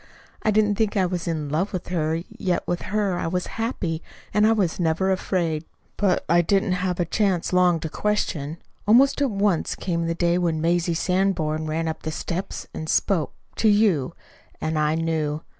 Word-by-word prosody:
I - - +1
didn't 210 -1 +3
think 215 -1 +1
I 190 - +3
was 175 -1 -3
in 155 -3 -2
love 170 +8 0
with 185 -3 -5
her, 160 -3 0
yet 180 -2 -2
with 175 0 -1
her 200 -3 0
I - - -2
was 180 +2 -1 0.2
happy, 175 -9 -2 0.3
and 210 +2 +4
I - - +5
was 195 -7 +1
never 175 +3 +1
afraid. 170 -4 0 0.3
"But 195 -3 +1
I 170 +2 +5
didn't 195 +3 +1
have 180 0 -1
a 175 - +2
chance 185 -1 0
long 180 -2 +4
to 160 - -2
question. 165 -5 -1 0.3
Almost 265 +6 +5
at 280 - +3
once 200 -5 +1
came 170 -2 -2
the 165 - -1
day 170 +1 +2
when 165 -3 0
Mazie 170 +1 +1
Sanborn 170 -4 0
ran 160 +1 -1
up 160 - -3
the 155 - -3
steps 175 +4 -4
and 155 - -5
spoke 180 -7 +1 0.2
to 220 - +4
you. 195 -8 +2 0.4
And 155 0 -1
I 150 +1 +2
knew. 160 -2 -1
175 Hz, 190 wpm, -24 LUFS, 160-195 Hz, 0.4 s, I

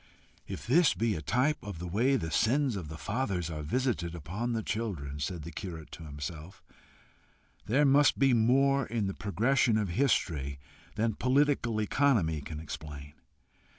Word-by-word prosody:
"If - - -6
this 160 +8 +4
be 115 -1 +1
a 80 - -4
type 125 - +1
of 100 -5 -7
the 90 - -6
way 115 +10 +2
the 80 -11 -2
sins 130 - +2
of 90 -6 -5
the 80 +1 -7
fathers 95 -6 -2
are 75 -1 -4
visited 90 - -1
upon 95 +10 -3
the 110 -1 -2
children," 85 -13 -3
said 80 +3 -3
the 85 - -7
curate 80 -2 -7
to 80 - -9
himself, 75 +4 -7 1.0
"there 135 +7 +3
must 140 +1 +5
be 135 -1 +4
more 135 +3 +3
in 115 -2 -1
the 95 - -2
progression 115 +5 +1
of 105 -3 -1
history 80 - 0 0.4
than 110 +1 +1
political 130 -3 +1
economy 105 - +2
can 75 +1 -7
explain. 75 -2 -8
105 Hz, 160 wpm, -30 LUFS, 80-130 Hz, 1.0 s, must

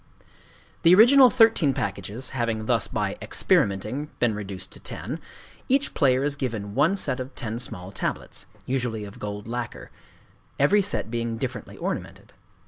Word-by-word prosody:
The 170 +2 +7
original 255 +5 +8
thirteen 225 - +4
packages 100 +6 -3
having 115 -4 -2
thus - - +1
by - - -2
"experimenting" 105 +10 +1
been 120 -3 +2
reduced 100 -3 -6
to - - -9
ten, - - -5 0.5
each 275 +2 +2
player 130 -2 +3
is 145 0 +1
given 110 -7 -4
one 155 - +3
set 130 -9 0
of 130 +1 -6
ten 115 -3 -3
small 90 -6 -5
tablets—usually 120 +1 -3
of 100 -1 -10
gold 105 0 -5
lacquer,—every 130 - -2
set 195 - -1
being 115 -1 -2
differently 125 0 -5
ornamented. - - -5
125 Hz, 135 wpm, -25 LUFS, 105-145 Hz, 0.5 s, original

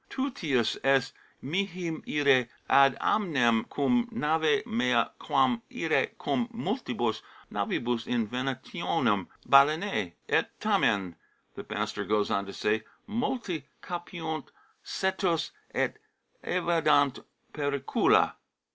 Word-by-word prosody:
Tutius 165 - -1
est 135 -1 +3 0.3
mihi 180 +2 -2 0.2
ire 140 -5 +3 0.2
ad 135 -1 +5
amnem 130 - +2
cum 240 - +1
nave 160 -2 +1
mea 235 0 +1
quam 235 -2 +2
ire - - +1
cum 240 -1 -1
multibus 180 - -2 0.3
navibus 120 -1 -1
in 115 -3 0
venationem 125 - -1 0.2
balaenae." 140 - +4
" - - -40
Et - - +2
tamen," 95 -4 +1 0.4
the - - -8
master - - -2
goes 105 -1 0
on 100 0 0
to 100 - -7
say, 105 +1 0 0.2
"multi 215 - -3 0.2
capiunt 170 -3 -5 0.4
cetos 190 -3 -1 0.2
et - - -1 0.5
evadunt 155 -6 +2 0.3
pericula." 140 -2 +2
150 Hz, 100 wpm, -28 LUFS, 125-185 Hz, 0.5 s, ad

